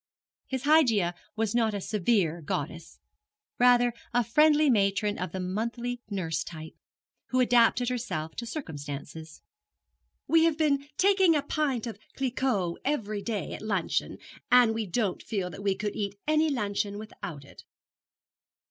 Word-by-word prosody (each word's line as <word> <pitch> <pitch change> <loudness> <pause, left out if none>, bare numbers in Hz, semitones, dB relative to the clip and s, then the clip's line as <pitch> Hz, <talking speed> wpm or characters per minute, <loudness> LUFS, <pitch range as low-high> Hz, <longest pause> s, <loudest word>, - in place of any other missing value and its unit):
His 260 -2 -3
Hygeia 240 - +4 0.2
was 220 -2 -1
not 225 -3 +1
a - - -2
severe 190 -4 0
goddess 155 +2 -5 0.6
rather 245 -1 +5 0.2
a 245 - +4
friendly 300 +6 +4
matron 205 -3 +2
of 185 - -3
the 190 - -4
monthly 235 +6 -3
nurse 165 -6 -2
type, 160 -1 -9 0.5
who 255 - 0
adapted 245 0 +4
herself 160 -10 -3
to 235 - -4
circumstances. 155 - -7 0.8
'We 325 0 +5
have 325 -2 +2
been 285 -3 +1
taking 380 -3 +4
a 290 - +1
pint 280 -6 -1
of 225 -4 -6 0.2
Cliquot 250 -9 0
every 215 -8 -1
day 215 -2 -3
at - - -7
luncheon, 200 -5 -1 0.3
and 245 -2 +6
we 220 -2 -3
don't 195 +1 -1
feel 190 -5 -3
that 195 - -9
we 200 -1 +1
could 210 +1 -3
eat 200 -1 -3
any 310 +1 +3
luncheon 205 -5 -2
without 175 -9 -8
it.' - - -15
220 Hz, 145 wpm, -28 LUFS, 190-255 Hz, 0.8 s, and